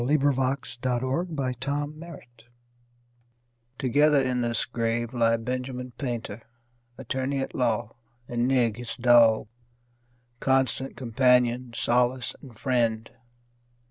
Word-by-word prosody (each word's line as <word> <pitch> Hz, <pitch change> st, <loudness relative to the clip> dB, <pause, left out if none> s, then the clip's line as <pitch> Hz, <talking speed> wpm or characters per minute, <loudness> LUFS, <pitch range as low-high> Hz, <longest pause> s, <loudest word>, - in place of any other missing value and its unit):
Edgar 145 Hz, +3 st, +3 dB
Lee -, -, -1 dB
Masters 130 Hz, +3 st, -1 dB
Benjamin 140 Hz, 0 st, -2 dB
Painter 120 Hz, -8 st, -13 dB, 1.3 s
TOGETHER 145 Hz, +3 st, +3 dB
in 125 Hz, -1 st, 0 dB
this 115 Hz, -1 st, 0 dB
grave 115 Hz, 0 st, -2 dB
lie 115 Hz, -1 st, +3 dB
Benjamin 125 Hz, +1 st, -4 dB
Painter, 120 Hz, -3 st, -5 dB, 0.6 s
attorney 135 Hz, +2 st, -2 dB
at 135 Hz, -, -3 dB
law, 120 Hz, -2 st, -1 dB, 0.3 s
And 120 Hz, 0 st, 0 dB
Nig, 120 Hz, -5 st, +2 dB
his 115 Hz, -1 st, -6 dB
dog, 120 Hz, -3 st, +5 dB, 0.9 s
constant 130 Hz, 0 st, 0 dB
companion, 125 Hz, 0 st, +2 dB
solace 125 Hz, +2 st, +1 dB
and 125 Hz, -6 st, -13 dB
friend. 115 Hz, -4 st, 0 dB
125 Hz, 105 wpm, -26 LUFS, 120-130 Hz, 1.3 s, dog